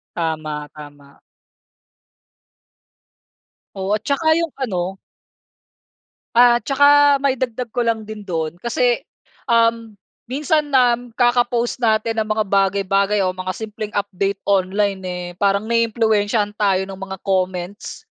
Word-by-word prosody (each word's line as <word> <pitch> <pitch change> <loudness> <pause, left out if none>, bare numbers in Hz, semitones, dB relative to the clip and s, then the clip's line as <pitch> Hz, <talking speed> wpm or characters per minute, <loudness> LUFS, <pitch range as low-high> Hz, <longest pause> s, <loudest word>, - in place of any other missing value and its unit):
Tama, 155 -3 -3
tama. 145 -2 -14 2.6
Oo, 190 0 -4
at 220 - -24
'tsaka 310 +3 +1
yung 335 -3 -2
ano. 195 -8 -3 1.4
At 240 0 +5
'tsaka 285 0 +5
maidagdag 255 -3 -1
ko 240 0 -1
lang 225 -1 0
din 215 -1 -9
do'n 165 -2 -3
kasi, 240 +2 +1 0.5
um, 230 -1 +2 0.3
minsan 300 +4 0
nam 245 -3 +2
kaka-post 240 -1 +1
natin 225 -1 +1
ng 215 - 0
mga 215 0 0
bagay-bagay 195 +1 +2
o 185 - +1
mga 185 0 -4
simpleng 215 +1 -7
update 200 -1 -2
online, 195 0 0
eh, 180 0 -4
parang 200 0 +2
naiimpluwensiyahan 220 -2 +1
tayo 195 -2 +2
ng 190 - -8
mga 190 0 -7
comments, 185 - -3
210 Hz, 115 wpm, -20 LUFS, 190-240 Hz, 2.6 s, At